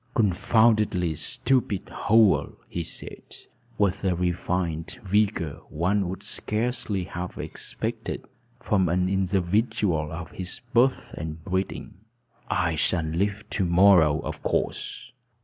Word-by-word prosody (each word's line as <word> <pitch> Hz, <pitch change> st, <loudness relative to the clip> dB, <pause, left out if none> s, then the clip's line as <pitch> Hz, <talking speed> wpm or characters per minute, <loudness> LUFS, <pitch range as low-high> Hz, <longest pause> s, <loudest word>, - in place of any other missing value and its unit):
"Confoundedly 105 Hz, -3 st, +3 dB
stupid 120 Hz, -, +1 dB
hole!" 110 Hz, -2 st, +3 dB
he 85 Hz, -, -3 dB
said -, -, -7 dB, 0.4 s
with 100 Hz, -1 st, +1 dB
a 95 Hz, -2 st, +2 dB
refined 90 Hz, -1 st, -2 dB
vigor 95 Hz, -6 st, +1 dB
one 90 Hz, +4 st, 0 dB
would 95 Hz, +2 st, -6 dB
scarcely 110 Hz, -1 st, -1 dB
have 90 Hz, -1 st, -6 dB
expected -, -, -4 dB, 0.3 s
from 95 Hz, -4 st, +1 dB
an 90 Hz, +2 st, +2 dB
individual 95 Hz, -3 st, +1 dB
of 80 Hz, -1 st, -6 dB
his 90 Hz, +3 st, -5 dB
birth 130 Hz, +2 st, +2 dB
and 80 Hz, 0 st, -6 dB
breeding. 95 Hz, 0 st, -3 dB, 0.5 s
"I 85 Hz, -2 st, +1 dB
shall 80 Hz, +1 st, 0 dB
leave 100 Hz, +6 st, -1 dB
to 100 Hz, -, 0 dB
morrow, 85 Hz, -4 st, +5 dB
of 75 Hz, 0 st, -6 dB
course. -, -, -2 dB
95 Hz, 115 wpm, -26 LUFS, 85-105 Hz, 0.5 s, morrow